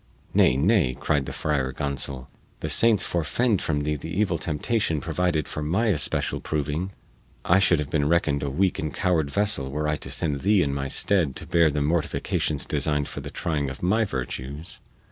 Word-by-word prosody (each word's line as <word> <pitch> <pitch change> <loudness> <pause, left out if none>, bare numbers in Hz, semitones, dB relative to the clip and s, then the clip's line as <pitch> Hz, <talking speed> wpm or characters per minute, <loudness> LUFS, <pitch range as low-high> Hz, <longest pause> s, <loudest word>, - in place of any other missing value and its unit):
"Nay, 65 - +4
nay," 80 - +2
cried 70 -3 0
the - - -4
Friar 70 -4 -1
Gonsol, 70 -2 -3 0.4
"the - - -3
saints 110 -4 +5
forefend 95 +7 0
from 75 -2 -1
thee 75 +1 -1
the 75 +3 -7
evil 90 -1 0
temptation 80 +2 -1
provided 80 -1 -1
for 75 - -5
my 95 +10 +1
especial 75 -9 +1
proving! 75 +5 -2 0.5
I 90 +2 +5
should 90 -3 +4
have 75 -2 -4
been 75 -2 +1
reckoned 80 -4 +2
a 70 - -2
weak 90 +7 +1
and 75 -1 -2
coward 85 -5 0
vessel 100 -6 0
were 75 +2 -2
I 75 0 0
to - - -7
send 70 -1 -1
thee 100 +3 +3
in 70 - -1
my 70 -1 -2
stead 80 0 +1
to - - -7
bear 85 -2 +4
the 75 0 -1
mortifications 75 -2 0
designed 75 0 0
for - - -6
the - - -7
trying 75 -4 -2
of 65 - -9
my 105 +6 +3
virtues." 70 - -5
75 Hz, 190 wpm, -25 LUFS, 70-90 Hz, 0.5 s, saints